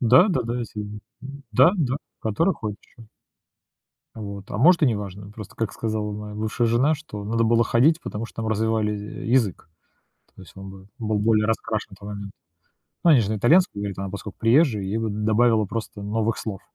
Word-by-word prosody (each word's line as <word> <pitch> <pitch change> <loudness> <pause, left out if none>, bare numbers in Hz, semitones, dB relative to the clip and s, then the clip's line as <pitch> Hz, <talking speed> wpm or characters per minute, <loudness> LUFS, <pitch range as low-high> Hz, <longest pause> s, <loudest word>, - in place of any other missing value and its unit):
Да-да-да, 125 - +4
есть, 115 - -7
э, 105 - -2
мгм. 105 0 -7 0.5
Да-да, 150 - +4 0.2
который 135 - +1
ходят 105 -2 -5
еще. 115 -2 -17 1.1
Вот. 100 -2 -8
А - - -3
может, 170 +5 +5
и - - +6
неважно. 100 -3 -3
Просто, 105 -2 -10
как 115 -2 -2
сказала 110 -2 -3
моя 105 0 -7
бывшая 110 +3 -1
жена, 130 +7 +3
что 105 -9 -8
надо 115 +2 +1
было 115 +1 +3
ходить, 145 +9 +3
потому 115 -7 -5
что - - -18
там 110 -1 -2
развивали, 110 -1 0
э, 105 0 -7
язык. 115 -9 +1 0.7
То - - -13
есть 90 - -14
он 95 0 -8
бы 95 0 -13
был 110 -2 -1
более 110 0 +3
раскрашен 115 -1 -1
на - - -11
то 100 - -13
момент. 100 -1 -7 0.7
Ну 170 - +6
они 135 -6 +7
же 105 0 -1
на 110 - 0
итальянском 145 - +3
говорит, 100 -2 -4
а - - -3
она 95 - -4
поскольку 100 0 -8
приезжая, 115 -2 +3
ей 95 +3 -2
бы 110 -1 -1
добавило 110 +1 +2
просто 110 0 -5
новых 110 +2 -1
слов, 100 -4 -5
110 Hz, 195 wpm, -24 LUFS, 105-120 Hz, 1.1 s, они